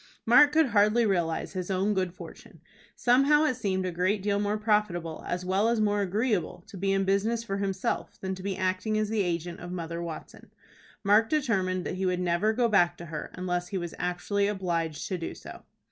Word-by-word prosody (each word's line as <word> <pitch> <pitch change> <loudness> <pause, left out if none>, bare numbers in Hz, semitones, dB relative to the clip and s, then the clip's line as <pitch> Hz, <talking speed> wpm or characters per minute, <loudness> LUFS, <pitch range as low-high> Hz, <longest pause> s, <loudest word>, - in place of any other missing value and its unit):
Mark 255 +6 +7
could 310 -2 +3
hardly 215 +2 +4
realize 175 -5 -1
his 185 -1 -4
own 195 +2 +1
good 185 -2 -1
fortune. 180 - -12 0.4
Somehow 275 +5 +4
it 295 - +2
seemed 195 -6 -2
a 185 - -2
great 185 +4 0
deal 200 0 +1
more 205 +1 0
profitable 210 -7 0
as 180 +1 -3
well 195 +4 +2
as 235 -1 +1
more 205 -1 +2
agreeable 200 -2 -1
to 215 - -11
be 195 +1 -1
in 195 0 +1
business 215 +4 +1
for 195 -4 -3
himself, 195 -1 -2
than 190 0 -3
to 190 - -8
be 195 0 -3
acting 185 +3 0
as 215 -1 0
the 220 -1 +1
agent 175 -1 -3
of 175 0 -8
Mother 170 -1 -4
Watson. 170 -2 -8 0.5
Mark 210 +2 +4
determined 190 - 0
that - - -4
he 190 0 0
would 180 -1 0
never 180 +4 +1
go 235 +2 +2
back 195 -6 +3
to 170 - -9
her 155 -2 -6
unless 180 -1 -2
he 195 - -3
was 175 -2 -5
actually 190 +3 0
obliged 170 -6 -2
to 185 -2 -3
do 165 - -5
so. - - -11
195 Hz, 205 wpm, -28 LUFS, 180-215 Hz, 0.5 s, Mark